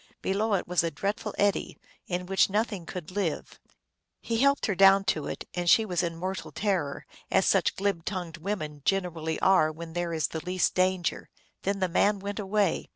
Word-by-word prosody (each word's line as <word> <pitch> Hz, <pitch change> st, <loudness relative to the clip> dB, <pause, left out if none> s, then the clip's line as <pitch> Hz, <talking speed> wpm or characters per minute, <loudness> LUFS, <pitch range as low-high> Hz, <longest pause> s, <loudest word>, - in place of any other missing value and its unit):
Below 205 Hz, +2 st, +1 dB
it 185 Hz, -, -2 dB
was 180 Hz, -1 st, +2 dB
a 165 Hz, -, 0 dB
dreadful 205 Hz, +4 st, -3 dB
eddy, 205 Hz, -1 st, 0 dB, 0.3 s
in 180 Hz, 0 st, -2 dB
which 190 Hz, +2 st, +3 dB
nothing 205 Hz, -4 st, -1 dB
could 180 Hz, -2 st, -7 dB
live. 185 Hz, -5 st, -3 dB, 0.6 s
He 230 Hz, -1 st, -2 dB
helped 280 Hz, +2 st, +3 dB
her 205 Hz, -, 0 dB
down 195 Hz, +1 st, +6 dB
to 155 Hz, -3 st, -5 dB
it, -, -, -6 dB
and 175 Hz, -1 st, 0 dB
she 225 Hz, -, +6 dB
was 180 Hz, -4 st, 0 dB
in 170 Hz, -2 st, -2 dB
mortal 185 Hz, +3 st, -4 dB
terror, 185 Hz, -9 st, -1 dB, 0.2 s
as -, -, +3 dB
such -, -, +2 dB
glib 195 Hz, -4 st, -1 dB
tongued 175 Hz, -3 st, -4 dB
women 155 Hz, -5 st, -4 dB
generally 170 Hz, -4 st, -1 dB
are 185 Hz, -5 st, +4 dB
when 165 Hz, +1 st, -9 dB
there 175 Hz, 0 st, -2 dB
is 160 Hz, -2 st, 0 dB
the 160 Hz, -, -5 dB
least 180 Hz, +1 st, 0 dB
danger. 185 Hz, -1 st, 0 dB, 0.3 s
Then 200 Hz, 0 st, -2 dB
the 185 Hz, -, +3 dB
man 200 Hz, +4 st, +2 dB
went 200 Hz, +2 st, -5 dB
away. 200 Hz, -2 st, 0 dB
185 Hz, 190 wpm, -28 LUFS, 170-200 Hz, 0.6 s, down